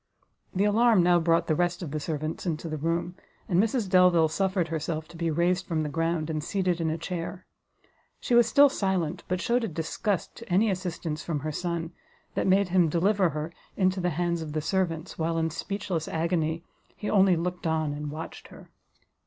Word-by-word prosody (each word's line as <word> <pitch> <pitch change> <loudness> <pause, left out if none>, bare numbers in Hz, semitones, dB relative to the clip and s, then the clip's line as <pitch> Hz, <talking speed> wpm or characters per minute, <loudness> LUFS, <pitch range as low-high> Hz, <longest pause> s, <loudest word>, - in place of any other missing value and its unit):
The 190 - +2
alarm 215 -1 +4
now 175 0 +5
brought 165 0 +2
the 160 - +1
rest 175 +2 0
of 155 - -5
the 155 - -2
servants 155 +3 -4
into 165 0 -2
the 155 -1 -4
room, 170 +3 -1 0.3
and 180 +1 +3
Mrs 225 -1 0
Delvile 180 -3 +5
suffered 185 0 0
herself 160 0 -3
to 170 - -13
be 165 0 -1
raised 175 +3 +1
from 160 -3 0
the 150 - -2
ground, 165 +1 -1
and 155 -2 -3
seated 180 -2 0
in 160 - 0
a 160 - -1
chair; 175 +2 -5 0.7
she 250 - -2
was 240 -1 +6
still 285 +5 +7
silent, 185 - -1
but 180 0 -1
shewed 240 +4 +1
a - - 0
disgust 170 +4 -2
to 230 - -11
any 205 +4 +4
assistance 170 -4 -4
from 155 -4 -2
her 155 +2 -3
son, 170 +1 -3 0.4
that - - 0
made 190 0 +3
him 175 -2 +4
deliver 190 +3 +2
her 155 +2 -4 0.2
into 185 -1 +2
the 180 0 +1
hands 170 +1 -1
of 155 -2 -6
the 155 - 0
servants, 170 -1 -2
while, 165 +1 0
in 160 0 0
speechless 195 -3 -3
agony, 165 0 -1 0.3
he 210 - -6
only 195 -3 +5
looked 175 +1 -3
on 155 -2 0
and 150 0 -5
watched 155 +2 -7
her. - - -15
170 Hz, 200 wpm, -27 LUFS, 160-185 Hz, 0.7 s, still